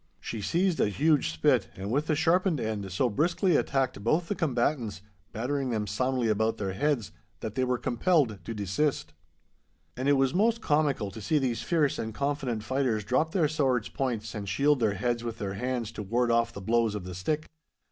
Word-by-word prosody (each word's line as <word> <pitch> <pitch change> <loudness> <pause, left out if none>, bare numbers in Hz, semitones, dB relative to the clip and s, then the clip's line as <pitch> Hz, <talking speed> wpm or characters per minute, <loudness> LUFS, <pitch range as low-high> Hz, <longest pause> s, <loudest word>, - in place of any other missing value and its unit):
She 110 - -5
seized 175 - +1
a - - +3
huge 150 +7 +2
spit, 80 0 +2
and 95 +3 -5
with 145 +5 0
the 155 - +2
sharpened 165 +1 +2
end 105 -4 -3
so 110 +8 +1
briskly 165 - +1
attacked 130 -8 0
both 165 +9 +1
the - - +1
combatants, 120 - -1 0.3
battering 130 +4 -2
them 110 -3 -1
soundly 125 +4 0
about 110 +1 +1
their 95 -2 -3
heads, 140 -1 0 0.3
that 110 - -4
they 130 - 0
were 125 -1 +1
compelled 120 - +1
to 115 - -4
desist. 100 - -1 0.8
And 130 +2 0
it - - +6
was 135 +1 +2
most 225 +5 +2
comical 145 - +1
to 110 - -9
see 155 +9 +1
these 130 -5 0
fierce 155 -5 +1
and 110 -1 -4
confident 140 -6 -2
fighters 130 -5 0
drop 140 +9 +1
their 165 -4 +2
swords' 135 -6 0
points 115 -5 -3
and 100 -3 -5
shield 140 +8 +3
their 110 -4 +1
heads 120 +3 -1
with 115 -1 -4
their 100 -3 -3
hands 120 +1 -2
to 110 - -6
ward 120 +4 +1
off 115 0 +2
the 100 - -8
blows 115 +1 +1
of 105 - -4
the 90 0 -7
stick. 150 - -2
125 Hz, 200 wpm, -28 LUFS, 110-145 Hz, 0.8 s, it